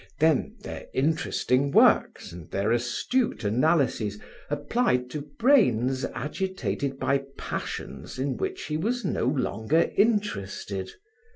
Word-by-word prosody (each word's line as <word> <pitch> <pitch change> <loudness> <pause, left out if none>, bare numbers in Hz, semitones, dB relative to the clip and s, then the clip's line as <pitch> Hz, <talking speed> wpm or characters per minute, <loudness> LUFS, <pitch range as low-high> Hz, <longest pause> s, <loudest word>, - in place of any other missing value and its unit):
Then 155 -2 +2
their - - -7
interesting 140 -2 +1
works - - +4
and 85 -2 -10
their 100 +3 0
astute 120 - 0
analyses 120 -2 +1 0.3
applied 145 - 0
to 150 - -4 0.2
brains 135 - +3
agitated 140 - -3
by 135 +1 0
passions - - -5
in 135 +1 -1
which 385 -1 -3
he 150 - -2
was 235 +6 -1
no 170 - 0
longer 130 +2 +1
interested. 100 - 0
135 Hz, 110 wpm, -26 LUFS, 120-175 Hz, 0.3 s, works